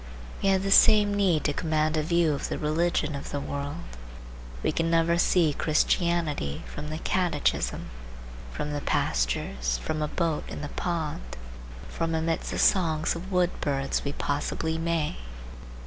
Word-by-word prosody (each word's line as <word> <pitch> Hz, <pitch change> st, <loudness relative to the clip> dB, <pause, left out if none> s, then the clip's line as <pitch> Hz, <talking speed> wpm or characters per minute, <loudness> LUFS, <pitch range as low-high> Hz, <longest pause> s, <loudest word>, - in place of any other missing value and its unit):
We 195 Hz, -, +2 dB
have 190 Hz, 0 st, +2 dB
the 195 Hz, -, -1 dB
same 205 Hz, 0 st, +6 dB
need 190 Hz, -6 st, +2 dB
to 145 Hz, -, +1 dB
command 155 Hz, 0 st, 0 dB
a 155 Hz, -, +2 dB
view 165 Hz, 0 st, +2 dB
of 140 Hz, -, -3 dB
the -, -, -2 dB
religion 155 Hz, 0 st, 0 dB
of 140 Hz, -, -6 dB
the 145 Hz, -, -2 dB
world. 145 Hz, +4 st, -5 dB, 0.8 s
We -, -, +2 dB
can 165 Hz, 0 st, 0 dB
never 165 Hz, +1 st, +3 dB
see 170 Hz, -4 st, +3 dB
Christianity 155 Hz, -, 0 dB
from 150 Hz, +1 st, -7 dB
the 155 Hz, -, -3 dB
catechism:—from 60 Hz, -, -3 dB
the 145 Hz, -, -2 dB
pastures, -, -, 0 dB
from 155 Hz, -, -3 dB
a 150 Hz, -, 0 dB
boat 165 Hz, -1 st, -1 dB
in -, -, -6 dB
the 145 Hz, -, -5 dB
pond, 150 Hz, -, -3 dB, 0.5 s
from 165 Hz, -1 st, -2 dB
amidst 165 Hz, 0 st, -1 dB
the -, -, -3 dB
songs 160 Hz, -5 st, +2 dB
of 185 Hz, +3 st, -7 dB
wood 180 Hz, -1 st, +2 dB
birds 135 Hz, -2 st, -1 dB
we 140 Hz, -, -3 dB
possibly 160 Hz, +3 st, -2 dB
may. 165 Hz, -, -1 dB
155 Hz, 155 wpm, -27 LUFS, 145-170 Hz, 0.8 s, same